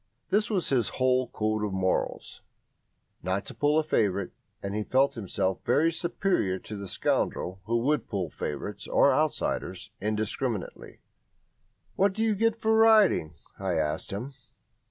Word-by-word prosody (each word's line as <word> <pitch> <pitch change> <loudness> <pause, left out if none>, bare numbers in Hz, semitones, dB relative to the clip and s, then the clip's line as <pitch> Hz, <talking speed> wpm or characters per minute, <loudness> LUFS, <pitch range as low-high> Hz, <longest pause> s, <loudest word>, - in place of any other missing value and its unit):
This 210 +2 +2
was 195 -6 0
his 125 -5 +2
whole 130 0 +2
code 110 -2 -1
of 105 -2 -2
morals 95 -1 -1 0.8
not 95 +2 -2
to - - -7
pull 145 +1 +2
a 160 - +3
favourite; 100 -10 0 0.3
and 100 0 -3
he 105 - -1
felt 135 +5 +2
himself 95 -3 -2
very 165 +3 +3
superior 170 - 0
to 105 - -8
the 100 -1 -6
scoundrel 95 +1 -1
who 115 +3 +1
would 145 -2 0
pull 95 -6 -2
favourites 100 +7 -5
or 140 - +4
outsiders 155 +2 -1
indiscriminately. 110 +1 -3 1.0
"What 195 0 +3
do 220 +3 -1
you 220 -1 +2
get 225 +2 +1
for 220 0 +2
riding?" 215 - +5 0.2
I 95 -3 -1
asked 75 -2 -1
him. 120 +8 -5
115 Hz, 150 wpm, -28 LUFS, 100-160 Hz, 1.0 s, riding